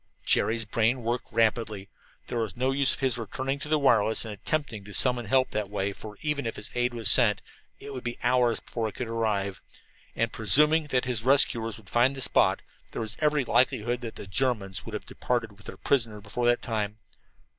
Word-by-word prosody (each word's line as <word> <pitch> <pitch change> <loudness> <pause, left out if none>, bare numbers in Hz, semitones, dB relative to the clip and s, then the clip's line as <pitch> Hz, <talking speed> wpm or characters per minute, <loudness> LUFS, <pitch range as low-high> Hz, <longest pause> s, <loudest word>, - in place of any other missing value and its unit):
Jerry's 115 +1 +1
brain 115 +3 0
worked 120 +2 -3
rapidly. 110 -3 0 0.4
There 120 - -3
was 110 0 -3
no 130 +2 +1
use 135 0 +2
of - - -13
his 130 -2 0
returning 130 +5 -3
to 145 - -5
the 155 - +3
wireless 115 -6 +3
and 110 - -5
attempting 110 0 -3
to 105 - -7
summon 125 -3 +2
help 130 +3 +2
that 105 -2 -2
way, 100 -1 -2
for 105 +1 -10
even 150 -5 -1
if 110 -1 -7
aid 120 0 0
was 115 -2 -1
sent 115 -5 +6 0.4
it 140 - -9
would 130 - -6
be 120 0 -4
hours 125 -1 +2
before 115 -2 -4
it 110 - -8
could 125 - -4
arrive, 105 -4 -2 0.5
and, 115 0 -1
presuming 150 +8 +4
that 130 -3 +1
the 125 -3 -2
rescuers 120 -4 +2
could 110 -3 -15
find 120 +6 +2
the 135 - -4
spot, - - +3 0.3
there - - -3
was 110 +1 -6
every 150 -3 +1
likelihood 120 0 +1
that 115 -2 -7
the - - -8
Germans 95 -3 -1
would - - -5
have - - -6
departed 120 -3 -2
with 105 +1 -16
their - - -8
prisoner 115 -6 0
before 120 +4 -2
that 120 0 +2
time. 105 -2 -2
120 Hz, 205 wpm, -27 LUFS, 110-130 Hz, 0.5 s, sent